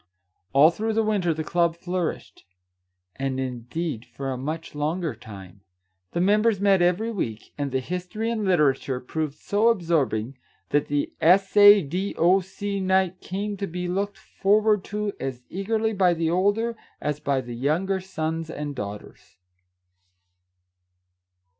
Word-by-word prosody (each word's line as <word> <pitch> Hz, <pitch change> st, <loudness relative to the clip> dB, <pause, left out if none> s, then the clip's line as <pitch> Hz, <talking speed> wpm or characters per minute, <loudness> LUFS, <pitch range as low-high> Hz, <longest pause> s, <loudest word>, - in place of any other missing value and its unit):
All 145 Hz, +4 st, +6 dB
through 220 Hz, +5 st, -2 dB
the 225 Hz, +1 st, +2 dB
winter 205 Hz, -5 st, +1 dB
the 160 Hz, 0 st, -2 dB
club 170 Hz, +1 st, +1 dB
flourished, 180 Hz, -1 st, -4 dB, 0.7 s
and 135 Hz, -1 st, -2 dB
indeed 125 Hz, +2 st, -4 dB
for 135 Hz, +1 st, -6 dB
a -, -, -2 dB
much 155 Hz, +6 st, -5 dB
longer 155 Hz, +1 st, -1 dB
time. 100 Hz, -3 st, -12 dB, 0.5 s
The 170 Hz, -, -1 dB
members 210 Hz, +3 st, +3 dB
met 195 Hz, -2 st, +4 dB
every 180 Hz, +6 st, +2 dB
week, 115 Hz, -, -4 dB
and 140 Hz, -2 st, -3 dB
the 130 Hz, -, +1 dB
history 180 Hz, -, -3 dB
and 220 Hz, -2 st, -2 dB
literature 145 Hz, -8 st, +2 dB
proved 150 Hz, +3 st, -3 dB
so 205 Hz, +7 st, +1 dB
absorbing 145 Hz, -, +1 dB, 0.3 s
that 145 Hz, 0 st, +1 dB
the 145 Hz, 0 st, -1 dB
S. 190 Hz, +5 st, +4 dB
A. 205 Hz, -1 st, +9 dB
D. 180 Hz, +8 st, -3 dB
O. 180 Hz, +4 st, +5 dB
C. 200 Hz, +2 st, -4 dB
night 190 Hz, -1 st, +1 dB
came 205 Hz, +2 st, -3 dB
to 200 Hz, 0 st, -3 dB
be 180 Hz, +1 st, -4 dB
looked 195 Hz, +3 st, -2 dB
forward 210 Hz, 0 st, +2 dB
to 210 Hz, 0 st, -3 dB
as 130 Hz, -2 st, -5 dB
eagerly 220 Hz, +4 st, -1 dB
by 185 Hz, -3 st, +3 dB
the 165 Hz, 0 st, 0 dB
older 205 Hz, +6 st, +1 dB, 0.2 s
as 150 Hz, 0 st, -2 dB
by 140 Hz, -2 st, 0 dB
the 120 Hz, -2 st, -6 dB
younger 165 Hz, +10 st, 0 dB
sons 160 Hz, -3 st, -3 dB
and 150 Hz, -2 st, -5 dB
daughters. 105 Hz, -4 st, -8 dB
175 Hz, 145 wpm, -25 LUFS, 145-200 Hz, 0.7 s, A